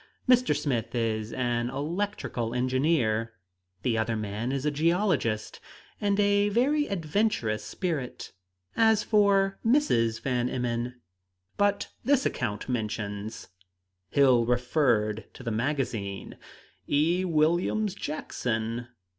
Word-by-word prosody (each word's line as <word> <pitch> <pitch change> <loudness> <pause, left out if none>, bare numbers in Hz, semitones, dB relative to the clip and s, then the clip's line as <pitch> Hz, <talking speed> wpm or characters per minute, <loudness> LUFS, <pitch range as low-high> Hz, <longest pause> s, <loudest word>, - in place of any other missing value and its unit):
Mr. 250 0 +4
Smith 125 -4 -2
is 110 -2 -1
an 120 -1 -1
electrical 145 - -3
engineer; 125 -3 +1 0.5
the 115 -3 +1
other 115 +1 0
man 110 +3 -3
is 135 +1 -2
a 150 - +2
geologist, 155 - 0 0.4
and 200 -1 +1
a 205 0 +3
very 280 +8 +2
adventurous 160 - 0
spirit. 145 - -4 0.4
As 220 -2 +4
for 200 -2 +3
Mrs. 120 - +2
Van 125 0 0
Emmon 120 0 -2 0.3
" 90 +1 -47
"But 205 0 +1
this 275 -1 +3
account 105 -4 -2
mentions" 110 -3 -4 0.6
Hill 125 -3 +4
referred 120 -4 +1
to - - -10
the 115 - -2
magazine 115 -5 -2 0.5
"'E. 165 +6 +2
Williams 175 +5 +1
Jackson.' 120 - -3
130 Hz, 110 wpm, -28 LUFS, 115-190 Hz, 0.6 s, Mr